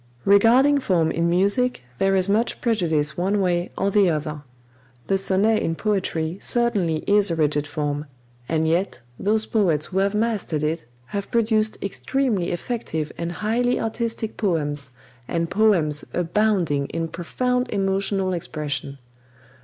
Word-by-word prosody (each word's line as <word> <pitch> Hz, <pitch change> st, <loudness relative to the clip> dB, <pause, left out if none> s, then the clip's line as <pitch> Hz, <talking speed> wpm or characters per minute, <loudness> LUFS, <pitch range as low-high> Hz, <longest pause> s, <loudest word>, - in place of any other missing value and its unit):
Regarding 245 Hz, +8 st, +5 dB
form 170 Hz, -10 st, +1 dB
in 170 Hz, +1 st, 0 dB
music 200 Hz, -, +2 dB, 0.2 s
there 195 Hz, 0 st, +3 dB
is 185 Hz, 0 st, +2 dB
much 215 Hz, +4 st, +1 dB
prejudice 160 Hz, -10 st, 0 dB
one 195 Hz, +3 st, +1 dB
way 175 Hz, -2 st, 0 dB
or 195 Hz, +1 st, +1 dB
the 200 Hz, -2 st, +4 dB
other. 150 Hz, -1 st, -3 dB, 0.6 s
The 195 Hz, 0 st, +1 dB
sonnet 200 Hz, +3 st, +2 dB
in 165 Hz, -, -1 dB
poetry 185 Hz, -4 st, -1 dB
certainly 200 Hz, -10 st, +1 dB
is 205 Hz, 0 st, +3 dB
a 165 Hz, -, 0 dB
rigid 150 Hz, -1 st, +1 dB
form; 145 Hz, 0 st, -3 dB, 0.4 s
and 160 Hz, -1 st, +1 dB
yet 170 Hz, -5 st, 0 dB, 0.2 s
those 215 Hz, +2 st, +1 dB
poets 170 Hz, -9 st, +1 dB
who 190 Hz, -, -2 dB
have 200 Hz, +1 st, +1 dB
mastered 210 Hz, -9 st, -1 dB
it 155 Hz, -3 st, -1 dB, 0.3 s
have 200 Hz, -1 st, -3 dB
produced 220 Hz, -2 st, +1 dB
extremely 215 Hz, -2 st, -1 dB
effective 170 Hz, -5 st, -3 dB
and 170 Hz, 0 st, -4 dB
highly 235 Hz, +7 st, 0 dB
artistic 225 Hz, -1 st, -3 dB
poems, 145 Hz, -, 0 dB, 0.4 s
and 170 Hz, 0 st, -2 dB
poems 180 Hz, -8 st, +2 dB
abounding 175 Hz, -5 st, +1 dB
in 165 Hz, 0 st, -3 dB
profound 250 Hz, +10 st, -1 dB
emotional 195 Hz, -1 st, +1 dB
expression. 145 Hz, -5 st, -4 dB
190 Hz, 140 wpm, -23 LUFS, 160-215 Hz, 0.6 s, Regarding